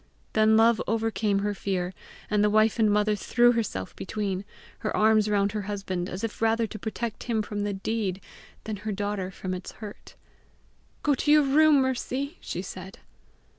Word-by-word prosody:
Then 220 0 +5
love 225 0 +5
overcame 220 -2 0
her 205 - 0
fear, 185 -2 -2 0.3
and 210 -1 +2
the 210 - +4
wife 215 +2 +3
and 215 -1 +4
mother 210 +1 +2
threw 240 +3 +4
herself 205 - -3
between, 195 -1 -3 0.3
her 215 - -2
arms 215 0 +4
round 200 -1 +2
her 210 0 -2
husband, 195 -3 -3
as 185 +4 -6
if 225 -1 -4
rather 225 0 +3
to 215 0 -8
protect 220 +1 -4
him 225 -3 0
from 205 -1 -4
the 205 0 -1
deed 195 -1 -2 0.4
than 215 -1 -4
her 215 +2 -4
daughter 205 -2 -2
from 185 -1 -5
its 185 0 -6
hurt. 210 -2 -10 0.9
"Go 295 - +3
to 295 +2 +1
your 300 0 +7
room, 290 +1 +5
Mercy," 260 +4 -2
she 180 - -4
said. 190 +1 -8
210 Hz, 175 wpm, -27 LUFS, 200-225 Hz, 0.9 s, your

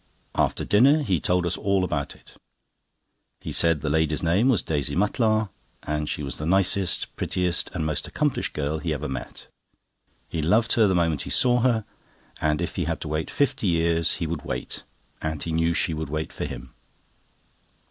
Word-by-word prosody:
After - - 0
dinner 140 +9 +5
he 95 - +1
told 90 +3 +1
us 85 - 0
all 100 -1 +1
about 75 -6 -2
it. - - -18 1.1
He - - -6
said 85 -3 +3
the 75 - -3
lady's 80 0 +1
name 95 +10 +3
was 120 -7 +3
Daisy 75 -4 -1
Mutlar, 110 +1 +2 0.3
and 75 0 -2
she 75 - -3
was 70 - -4
the 75 - -3
nicest, 95 0 +1
prettiest, 90 -1 0
and 80 -3 -1
most 75 -1 -1
accomplished - - -1
girl 75 +1 -2
he 80 -1 -2
ever 75 +2 -4
met. 65 - -6 0.8
He 80 - -3
loved 110 +9 +3
her 110 -3 +5
the 95 - +2
moment 80 -4 +1
he - - -6
saw 125 -1 +3
her, 115 -3 +2 0.6
and 75 +2 +1
if 85 - -5
he - - 0
had - - -2
to - - -4
wait 75 +1 -2
fifty 135 -7 0
years 85 -1 +2
he 85 - -3
would 80 -2 -3
wait, - - -4 0.4
and 80 -1 -3
he 85 - -3
knew 80 +1 +2
she 80 - +1
would 80 -2 -4
wait 80 +1 -3
for - - -4
him. - - -8
85 Hz, 190 wpm, -25 LUFS, 75-100 Hz, 1.1 s, dinner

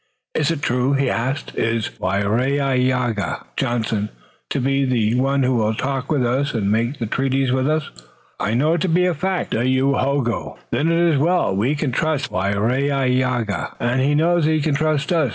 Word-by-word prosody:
"Is 150 0 +1
it 160 -3 -2
true?" 125 +3 +1
he 135 -1 +1
asked. 130 +5 -2
"Is 115 -1 -1
Waraiyageh 125 +3 0
(Johnson) 110 -3 -1 0.4
to - - -1
be 135 +1 +1
the 115 -4 +1
one 135 +2 +1
who 125 -1 +2
will 110 0 +1
talk 135 +3 -3
with 140 -5 +2
us 135 +3 0
and 100 -3 0
make 120 +6 0
the 115 - -3
treaties 135 +2 0
with 130 +2 +1
us?" 155 -1 0 0.5
"I 105 +3 0
know 150 +6 +2
it 170 - -1
to 190 - 0
be 180 +2 +3
a 180 - +2
fact, 185 +4 -2
Dayohogo." 130 +1 0
"Then 165 +3 +1
it 165 - +2
is 170 -4 +3
well. 170 - +2
We 120 +9 +1
can 145 -2 -1
trust 150 +2 -1
Waraiyageh, 125 +3 0
and 120 +2 0
he 145 +2 +2
knows 170 +1 +2
that 155 - +2
he 155 - +2
can 150 0 0
trust 155 +2 0
us. 155 -6 +2
130 Hz, 185 wpm, -20 LUFS, 120-145 Hz, 0.5 s, be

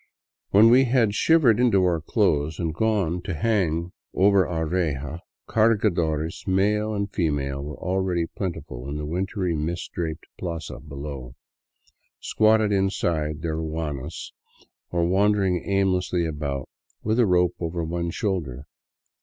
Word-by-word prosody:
When 110 +4 +6
we 130 +2 +6
had 120 -4 +2
shivered 135 -4 +4
into 115 -7 +4
our 85 -3 +1
clothes 75 0 +1
and 85 -3 -2
gone 95 -3 0
to 90 0 -4
hang 85 -3 0 0.2
over 100 0 +4
our 80 -2 -2
reja, 80 -3 -2 0.3
cargadores 85 -8 +1
male 105 +3 +1
and 100 0 -3
female 70 -5 -1
were 75 0 -7
already 90 -2 0
plentiful 75 -9 -6
in 75 - -4
the 75 - -4
wintry, 90 +2 -2
mistrdraped 80 0 -4
plaza 85 -4 -5
below, 70 -4 -8 0.8
squatted 110 -1 +3
inside 85 -6 0
their 80 -2 -1
ruanas 80 -4 -4 0.6
or 85 -1 +1
wandering 95 -1 +2
aimlessly 95 -3 +1
about 75 -4 -3 0.4
with 110 +3 +1
a 120 - +5
rope 90 -1 +3
over 85 0 -3
one 85 +1 -2
shoulder. 80 - -3
85 Hz, 130 wpm, -24 LUFS, 80-100 Hz, 0.8 s, When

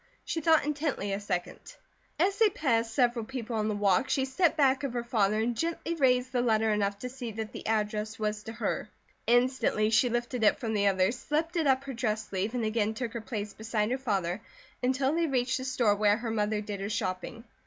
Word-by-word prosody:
She 325 - -2
thought 320 -1 +4
intently 290 -9 -1
a 195 - -1
second. 180 -4 -3 0.6
As 390 +5 +2
they 445 -2 +6
passed 235 - 0
several 240 -1 +2
people 235 -1 -5
on 215 0 0
the 215 - -1
walk 205 +5 +2
she 265 - +1
stepped 320 +5 +1
back 270 -1 +3
of 275 -4 -2
her 240 -1 -2
father 215 -3 +1
and 235 +2 0
gently 335 +3 -2
raised 255 -4 +2
the 250 -1 +1
letter 220 -2 +2
enough 200 -1 0
to 250 - -3
see 250 -2 -6
that 220 0 -5
the - - -7
address 215 0 -1
was 210 -1 -2
to 225 - -6
her. - - -2 0.4
Instantly 245 -3 +2
she 245 +2 +4
lifted 240 0 -2
it 210 - +4
from 230 -4 -2
the 205 -1 +2
others, 195 +5 +2
slipped 320 +4 -1
it 325 -4 +1
up 265 0 +3
her 275 -1 -6
dress 220 -2 -1
sleeve, 200 +5 -2
and 235 -2 0
again 215 0 0
took 235 0 -4
her 235 - -4
place 210 -2 -5
beside 220 0 -1
her 260 - 0
father 195 -6 -1 0.4
until 265 +2 +1
they 335 0 +1
reached 255 -2 +1
the 260 - -5
store 245 -5 +2
where 205 0 +3
her 230 -1 -4
mother 210 -1 0
did 205 -1 -5
her 200 - -3
shopping. 205 +2 -3
230 Hz, 220 wpm, -29 LUFS, 210-260 Hz, 0.6 s, they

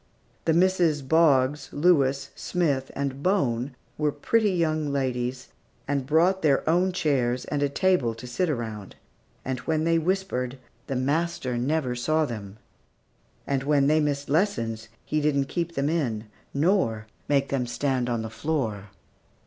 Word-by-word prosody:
The 160 - +3
Misses 170 -4 +3
Boggs, 140 -2 +3
Lewis, 145 -4 +2
Smith, 145 -7 -1
and 140 -1 -3
Bone 135 - 0 0.2
were 150 -1 +2
pretty 210 +9 +1
young 155 -5 0
ladies, 125 -2 -2 0.4
and 140 -2 -1
brought 175 +6 +3
their 145 -2 +2
own 180 +4 +3
chairs 130 -8 0
and 145 -1 -2
a 145 - +2
table 140 -8 +1
to 115 - -10
sit 160 +9 -1
around; 110 -7 -4 0.5
and 130 -1 -2
when 155 +3 -1
they 165 0 +3
whispered, 160 -8 -1 0.3
the 135 - -2
master 145 0 -1
never 130 +1 0
saw 155 +6 +1
them; 105 -6 -7 0.9
and 135 -1 0
when 140 0 +2
they 155 +2 +4
missed 145 -2 -1
in - - -1
lessons, 115 - 0 0.2
he 155 - 0
didn't 140 -2 +2
keep 170 -1 -3
them 140 +1 0
in, 130 -10 -1 0.3
nor 140 - +1 0.2
make 140 -1 +2
them 130 -3 -1
stand 130 0 -1
on 115 -2 -1
the 110 - -6
floor. 110 -8 -2
140 Hz, 150 wpm, -26 LUFS, 125-160 Hz, 0.9 s, they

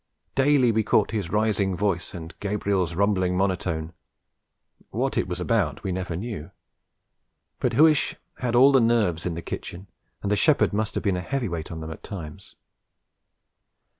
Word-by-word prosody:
Daily 135 -3 +4
we 110 0 +2
caught 105 0 +2
his 105 -7 -2
rising 105 -2 +1
voice 95 -4 -1
and 80 -1 -8
Gabriel's 100 -4 -1
rumbling 95 -2 +1
monotone; 90 -4 -1 1.0
what - - -1
it - - 0
was - - -3
about - - 0
we 95 - -2
never 90 -2 -3
knew; 100 -4 -5 1.1
but - - 0
Huish 155 0 +4 0.2
had 120 -2 -1
all 135 +3 +7
the 135 -2 +5
nerves 105 -8 +2
in 85 - -3
the 85 - -6
kitchen, 90 +3 -6 0.4
and 100 - -1
the - - +4
shepherd 140 +1 +3
must 110 +1 -1
have - - -2
been 100 -4 +1
a - - -2
heavyweight 90 - -3
on 80 -1 -6
them 80 0 -6
at 80 - -9
times. 80 -7 -9
100 Hz, 165 wpm, -25 LUFS, 85-110 Hz, 1.1 s, all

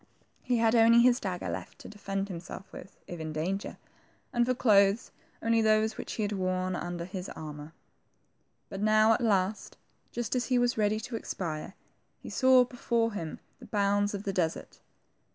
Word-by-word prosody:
He 250 -1 0
had 225 0 +3
only 230 0 +6
his 245 0 +4
dagger 185 -3 -4
left - - -6
to - - -11
defend 195 -1 -4
himself 185 +1 -8
with, 195 - -11
if 175 - -8
in 160 0 -4
danger; 185 +6 -3 0.6
and 240 -1 +2
for 255 - +1
clothes, 205 -2 +3 0.3
only 230 0 +3
those 215 0 +2
which - - -6
he 220 - -2
had 205 - -1
worn 185 -1 -1
under 175 -1 -4
his 185 0 -6
armor. 150 0 -8 0.9
But 195 - -7
now 215 +1 +5
at 225 - -1
last, 205 -2 0 0.3
just 240 0 -3
as 250 - 0
he 255 - +2
was 245 0 +2
ready 215 0 +1
to 240 +1 -6
expire, 170 -5 -5 0.4
he - - -10
saw 260 -1 +5
before 235 -2 -1
him 165 -6 -5 0.2
the - - -12
bounds 205 0 +1
of 200 - -6
the 195 - -2
desert. 165 -3 -2
205 Hz, 175 wpm, -29 LUFS, 185-230 Hz, 0.9 s, only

